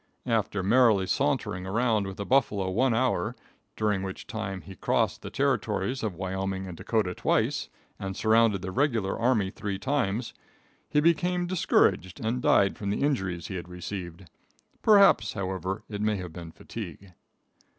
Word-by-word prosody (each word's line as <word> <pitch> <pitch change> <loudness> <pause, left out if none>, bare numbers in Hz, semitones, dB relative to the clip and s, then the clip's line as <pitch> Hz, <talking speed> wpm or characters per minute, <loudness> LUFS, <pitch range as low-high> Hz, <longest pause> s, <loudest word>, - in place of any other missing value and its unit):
After 105 -4 0
merrily 110 -2 +4
sauntering 95 0 -1
around 110 0 +1
with 95 - -7
the 100 - -4
buffalo 105 -8 +2
one 125 +7 +2
hour, 130 +2 0 0.4
during 105 -3 0
which 95 -1 -6
time 95 -4 -5
he 95 - -11
crossed - - 0
the - - -6
territories 125 +8 0
of 105 -5 -2
Wyoming 95 +1 -3
and 90 -2 -7
Dakota 105 -1 -1
twice - - 0 0.3
and 95 -1 -5
surrounded 110 -3 +3
the 95 - -4
regular 120 -5 +1
army 115 -5 +2
three 100 -1 -4
times, 120 -3 -1 0.6
he 150 - +3
became 175 +2 +2
discouraged 95 - +2
and 120 +2 -1
died 100 -4 +3
fiom 100 - -4
the 105 - -1
injuries 95 - -1
he 95 - -4
had 85 0 -7
received. 90 0 -7 0.5
Perhaps, 200 -2 +5
however, 95 0 -3
it 105 -1 -5
may 105 0 +1
have 90 -4 -6
been 85 -1 -8
fatigue. 95 -1 -9
100 Hz, 155 wpm, -27 LUFS, 95-115 Hz, 0.6 s, Perhaps